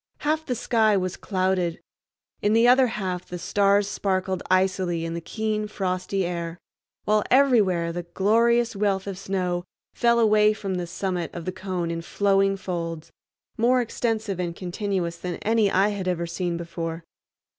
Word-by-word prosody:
Half 310 +1 0
the 250 - -1
sky 220 -3 +2
was 185 -1 -2
clouded; 185 -3 -1 0.6
in 205 +1 +2
the 230 +2 +5
other 255 +1 +6
half 185 -5 -4
the 180 - -5
stars 200 +3 +2
sparkled 190 -2 -1
icily 185 -2 +1
in 165 - -4
the 170 - -4
keen, 215 +4 -2
frosty 190 -1 -2
air; 170 -1 -4 0.5
while 210 0 +3
everywhere 210 -11 +4
the 175 - -3
glorious 225 +6 +2
wealth 195 -1 0
of 200 -1 -4
snow 180 -2 -2 0.3
fell 235 0 +3
away 215 -1 +5
from 200 -2 -4
the 180 -1 -3
summit 180 -2 -3
of 170 -1 -6
the 185 - -2
cone 185 -2 -3
in 165 0 -3
flowing 195 +2 +2
folds, 170 -4 -5 0.5
more 250 +3 +4
extensive 220 -4 -2
and 170 -2 -2
continuous 180 -2 -3
than 180 -1 -4
any 220 -1 +3
I 195 +2 +3
had 200 -3 -4
ever 175 -2 0
seen 170 0 -2
before. 165 -1 -5
190 Hz, 160 wpm, -25 LUFS, 175-215 Hz, 0.6 s, other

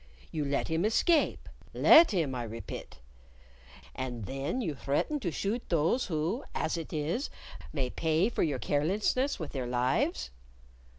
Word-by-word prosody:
You 155 -3 -2
let 140 0 0
him 160 +1 0
escape 300 - +2 0.3
let 330 +1 +8
him, 165 -10 0
I 120 -2 -3
repit 115 +1 -7 1.0
and 125 -4 -4
then 135 - -3
you 175 -11 -1
threaten 140 - -1
to 190 - -2
shoot 205 +9 -2
those 170 - +2
who, 170 - -1
as 160 - 0
it 165 -2 -5
is, 160 - -1 0.4
may 130 -4 -2
pay 160 +4 +1
for 240 - -2
your 145 -5 +1
carelessness 200 - +1
with 160 -4 -5
their 130 -3 -3
lives. 120 - 0
155 Hz, 145 wpm, -30 LUFS, 135-205 Hz, 1.0 s, let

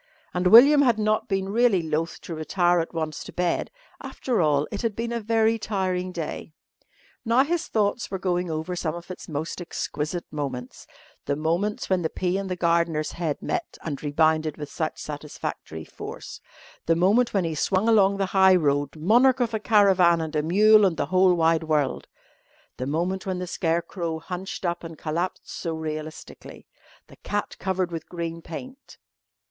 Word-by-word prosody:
And 180 0 +1
William 275 +9 +8
had 240 -5 +3
not 215 +2 0
been 195 -2 -1
really 215 -4 +3
loth 160 +1 -2
to 170 - -7
retire 175 +2 +1
at 165 - -3
once 160 -3 -4
to - - -10
bed. 175 -1 -1 0.3
After 265 - -2
all, 150 -2 +2
it 205 - -4
had 225 -3 -1
been 230 +1 -3
a 235 - -1
very 225 0 +2
tiring 185 -4 -2
day. 165 -2 -6 0.7
Now 235 +3 +4
his 335 +3 -2
thoughts 215 +1 0
were 190 - -3
going 180 -1 -1
over 160 +3 -3
some 165 -2 -2
of 175 +2 -9
its 180 - -9
most 155 +4 -4
exquisite 170 0 -4
moments 130 -4 -5 0.4
the 140 - 0
moments 170 +8 -1
when 185 -1 +1
the 160 - -1
pea 185 +1 -1
and 195 -1 -5
the 185 - -1
gardener's 170 -3 +1
head 165 -4 -3
met 355 -2 -3
and 145 -4 -4
rebounded 155 +1 +1
with 150 -1 -7
such 160 -2 -3
satisfactory 145 - -6
force; - - -9 0.5
the 165 - +4
moment 205 +8 +3
when 195 -3 +1
he 165 -1 -2
swung 185 +7 +1
along 200 -3 +4
the 195 - +1
high 190 -1 +6
road, 145 -4 +1
monarch 240 +11 +4
of 235 -2 0
a 220 - 0
caravan 195 -6 +4
and 160 -1 -4
a 150 - +2
mule 210 +7 +5
and 180 -5 +2
the 145 - 0
whole 185 -1 +5
wide 165 -1 +2
world; 150 -4 0 0.7
the 130 - -4
moment 175 +6 -2
when 185 -1 -1
the 180 - -3
scarecrow 170 -1 -2
hunched 180 +3 -6
up 175 0 -2
and 165 -1 -8
collapsed 170 +5 -3
so 165 -2 -4
realistically; 155 0 -7 0.4
the - - -17
cat 205 0 -3
covered 185 -2 -1
with 165 -2 -6
green 170 -1 -5
paint.... 255 - -10
175 Hz, 180 wpm, -25 LUFS, 160-200 Hz, 0.7 s, William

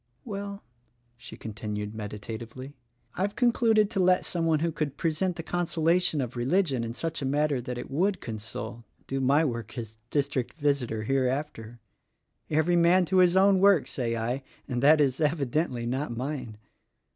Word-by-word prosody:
"Well," 200 -2 -6 0.5
she - - -11
continued 105 -1 -5
meditatively, 115 +5 -7 0.4
"I've 200 +3 -2
concluded 225 -3 +3
to 205 - -1
let 180 0 +4
some 165 -2 -1
one 155 -2 +2
who 170 0 +1
could 150 -3 -3
present 170 +3 0
the 165 - -6
consolation 170 -1 +1
of 125 -1 -4
religion 135 0 +1
in 115 0 -4
such 165 +4 -3
a - - -3
manner 145 -1 +1
that 125 0 -5
it 125 - -7
would 185 +7 +1
console, 110 +1 -6 0.2
do 135 0 -2
my 140 +5 +4
work 115 -5 -4
as 110 -2 -7
district 140 -4 -1
visitor 140 -7 0
hereafter. 130 -2 -2 0.7
Every 160 +3 +2
man 175 +2 +5
to 185 +3 +1
his 180 0 +5
own 195 0 +5
work, 195 -9 +5
say 120 -3 -2
I; 120 +4 -2 0.3
and 125 -2 -2
that 150 +3 +6
is, 135 -1 +2
evidently, 145 -4 0
not 125 0 -2
mine. 125 -4 -4
145 Hz, 160 wpm, -28 LUFS, 120-175 Hz, 0.7 s, that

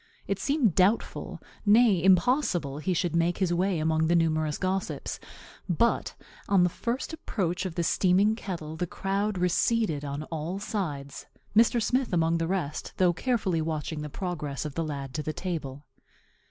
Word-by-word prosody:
It 200 0 -2
seemed 275 - +2
doubtful, 195 +6 +1 0.2
nay, 210 -4 +5
impossible, 185 - +2
he 170 +5 -1
should 170 0 0
make 170 +1 +2
his 185 -3 +1
way 185 +1 +1
among 160 0 +1
the 170 - +3
numerous 155 -2 +1
gossips 185 0 -2 0.5
but 230 +7 +1 0.3
on 195 -3 +5
the 180 - +2
first 245 - -3
approach 185 - -2
of 170 - -8
the 170 - 0
steaming 190 +5 +3
kettle 170 -8 -6
the 175 +2 -2
crowd 195 +3 -1
receded 180 -2 +1
on 145 +1 -4
all 165 +4 -3
sides, 160 -10 -4 0.3
Mr. 230 +2 +5
Smith 250 0 0
among 165 -1 +2
the 165 - 0
rest, 170 -5 -3
though 180 -2 +4
carefully 190 -5 0
watching 155 -1 -3
the 150 - -5
progress 150 -5 -4
of 150 - -4
the 165 - -1
lad 140 -4 -5
to 155 - -2
the 155 +1 -3
table. 150 -6 -5
175 Hz, 165 wpm, -28 LUFS, 155-200 Hz, 0.5 s, nay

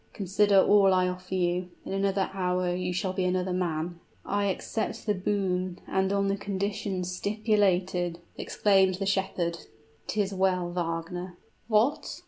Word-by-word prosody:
Consider 200 0 +3
all 195 -1 +5
I 185 0 +3
offer 180 +1 -4
you: 180 0 0 0.2
in - - -4
another 195 0 0
hour 180 -1 0
you 180 0 -2
shall 185 +1 -1
be 190 - -1
another 180 0 0
man!" 170 -1 -2 0.3
"I 205 +1 0
accept 200 +3 -3
the 210 - +2
boon 185 -2 -1
and 190 0 +1
on 200 0 +1
the 195 - +1
conditions 195 -2 -3
stipulated!" 190 -4 +1 0.2
exclaimed 190 -2 +2
the 195 +2 -3
shepherd. 190 -3 -1 0.5
"'Tis 205 -2 -1
well, 185 -2 +1
Wagner 175 +1 -4 0.2
" - - -39
"What! 290 +11 0
185 Hz, 145 wpm, -28 LUFS, 180-200 Hz, 0.5 s, all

